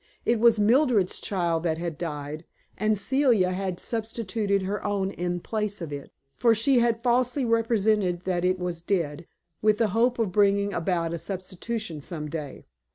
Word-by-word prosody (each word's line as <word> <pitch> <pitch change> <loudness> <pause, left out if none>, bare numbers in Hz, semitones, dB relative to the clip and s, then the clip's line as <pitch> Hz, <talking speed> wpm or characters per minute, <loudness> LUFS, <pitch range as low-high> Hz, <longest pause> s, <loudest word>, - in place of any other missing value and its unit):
It 235 -1 +2
was 230 -1 +5
Mildred's 225 -2 +3
child 170 -4 -1
that 160 -2 0
had 170 -1 -4
died, 150 -1 -5 0.3
and 215 +1 +1
Celia 225 -3 +2
had 185 -1 -3
substituted 215 -3 -2
her 200 +2 -3
own 200 -2 -1
in 175 -1 -2
place 210 0 -3
of 165 -4 -6
it. 140 -1 -7 0.3
For 230 -2 +4
she 245 +4 +3
had 235 -1 +1
falsely 250 +2 +2
represented 220 -5 +2
that 180 -2 -1
it 185 +1 +2
was 180 -2 -4
dead, 170 -3 -2 0.3
with 215 0 +3
the 225 -1 +2
hope 235 +5 +2
of 225 -5 0
bringing 200 +1 +3
about 170 -1 -1
a 170 - -3
substitution 185 -1 -5
some 150 0 -5
day. 150 -4 -6
200 Hz, 165 wpm, -26 LUFS, 175-225 Hz, 0.3 s, was